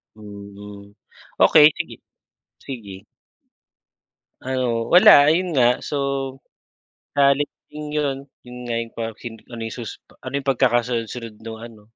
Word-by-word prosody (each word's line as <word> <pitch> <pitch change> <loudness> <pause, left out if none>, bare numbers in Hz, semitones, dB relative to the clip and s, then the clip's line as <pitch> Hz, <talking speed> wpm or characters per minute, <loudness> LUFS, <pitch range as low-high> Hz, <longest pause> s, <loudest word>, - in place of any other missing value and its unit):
Mhm. 100 -1 -12 0.4
Okey, 150 - +8
sige. - - -5 0.6
Sige. 105 -6 -9 1.4
Ano 125 -3 -2
wala, 150 -4 +8
ayon 175 -1 0
nga. 125 -1 +3
So, 145 - -4 1.2
sa 140 -1 +5
halip 145 +1 +1 0.2
din 150 0 -7
yon, 145 -3 0 0.3
yun 125 0 -11
nga 120 - -2
yung 115 - -10
pahoksin 115 0 -6
ano 120 -2 -8
yung 115 0 -5
susu 115 -3 -8 0.2
ano 130 +1 -9
yung 140 0 -3
pagkakasunod-sunod 120 -2 -1
nung 110 -1 -7
ano, 115 -3 -12
120 Hz, 125 wpm, -22 LUFS, 110-140 Hz, 1.4 s, Okey